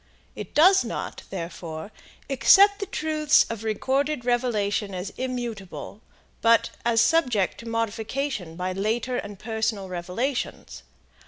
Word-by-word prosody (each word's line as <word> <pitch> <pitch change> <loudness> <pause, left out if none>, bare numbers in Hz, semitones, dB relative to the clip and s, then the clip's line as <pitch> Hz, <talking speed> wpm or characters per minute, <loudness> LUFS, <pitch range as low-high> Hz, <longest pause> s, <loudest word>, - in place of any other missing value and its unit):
It - - -8
does 375 +5 +6
not, - - -5
therefore, 170 -1 -6 0.4
accept 400 +9 +6
the 400 - -3
truths 305 -1 +3
of 225 -1 -5
recorded 265 +5 -1
revelation 215 -5 0
as 185 +2 -5
immutable, 235 -6 -5 0.4
but 230 0 +4
as 230 -1 +2
subject 245 - +2
to 230 - -8
modification 230 - -3
by 180 +1 -2
later 225 +6 -1
and 205 -3 -6
personal 220 -2 -2
revelations. 185 +10 -3
230 Hz, 115 wpm, -25 LUFS, 200-265 Hz, 0.4 s, does